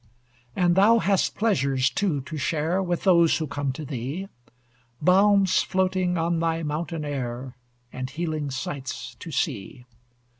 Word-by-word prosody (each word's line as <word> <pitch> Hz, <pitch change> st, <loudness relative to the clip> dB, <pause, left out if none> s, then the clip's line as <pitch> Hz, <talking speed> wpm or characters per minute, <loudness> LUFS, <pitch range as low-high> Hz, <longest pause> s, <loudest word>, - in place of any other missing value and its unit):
And 175 Hz, -2 st, +3 dB
thou 205 Hz, +5 st, +5 dB
hast 200 Hz, -4 st, +1 dB
pleasures, 135 Hz, -, +1 dB
too, 155 Hz, -2 st, 0 dB
to 155 Hz, +5 st, -8 dB
share 160 Hz, +5 st, 0 dB
With 175 Hz, -2 st, -2 dB
those 170 Hz, -4 st, +5 dB
who 160 Hz, -, -2 dB
come 145 Hz, -1 st, -2 dB
to 150 Hz, +3 st, -7 dB
thee 140 Hz, +8 st, -5 dB, 0.7 s
Balms 195 Hz, +3 st, +4 dB
floating 185 Hz, -1 st, 0 dB
on 165 Hz, 0 st, 0 dB
thy 165 Hz, 0 st, 0 dB
mountain 155 Hz, +1 st, -3 dB
air, 130 Hz, -2 st, -4 dB, 0.4 s
And 130 Hz, 0 st, -4 dB
healing 155 Hz, 0 st, -3 dB
sights 130 Hz, -5 st, -5 dB
to -, -, -8 dB
see. 125 Hz, -, -3 dB
160 Hz, 140 wpm, -25 LUFS, 135-185 Hz, 0.7 s, thou